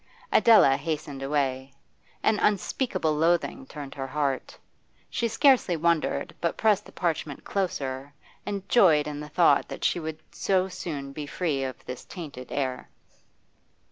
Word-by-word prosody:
Adela 175 -12 +6
hastened 145 -2 -4
away. 135 -1 -1 0.5
An 215 -1 +3
unspeakable 195 - +1
loathing 170 - +1
turned 145 -3 -8
her 135 -1 -5
heart. 140 -1 -2 0.5
She 235 - 0
scarcely 245 - +4
wondered, 170 0 0
but 170 - -1
pressed 210 -2 +2
the - - -13
parchment 155 -4 -2
closer, 140 -8 -3 0.3
and 200 -1 -4
joyed 165 -12 +5
in 150 -1 -5
the 150 0 -7
thought 150 -3 +4
that - - -8
she - - +2
would 160 -1 -5
so 190 -1 +1
soon 145 -7 -5
be 150 0 -6
free 145 -4 -1
of 130 -1 -6
this 125 -1 -7
tainted 145 -8 -9
air. 130 -3 -2
155 Hz, 140 wpm, -27 LUFS, 140-185 Hz, 0.5 s, Adela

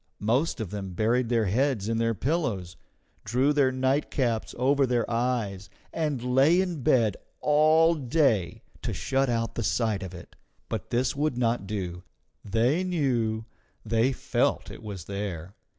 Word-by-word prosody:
Most 125 +9 0
of 110 -5 -4
them 95 -3 -5
buried 115 +5 +1
their 115 -3 +2
heads 115 +1 +1
in 115 0 0
their 115 0 +1
pillows, 105 - -2 0.5
drew 130 +7 +2
their 140 -3 +3
nightcaps 130 -3 0
over 135 +2 +3
their 120 -2 +1
eyes, 115 -5 -1 0.2
and 150 -6 -1
lay 135 +7 +4
in 180 -6 -1
bed 115 -4 +3 0.2
all 155 +2 +4
day 130 - +1 0.2
to - - -3
shut 135 0 0
out 115 -1 -1
the - - -3
sight 110 -2 0
of 95 -1 -7
it. 85 - -12 0.3
But - - -4
this 125 +2 0
would 145 -2 0
not 115 -4 0
do; 90 -4 -4 0.4
they 120 - +1
knew, 120 -11 0 0.4
they 115 +4 +2
felt 130 - -1
it - - -10
was 100 -5 -7
there. 100 -3 -5
120 Hz, 150 wpm, -27 LUFS, 105-135 Hz, 0.5 s, lay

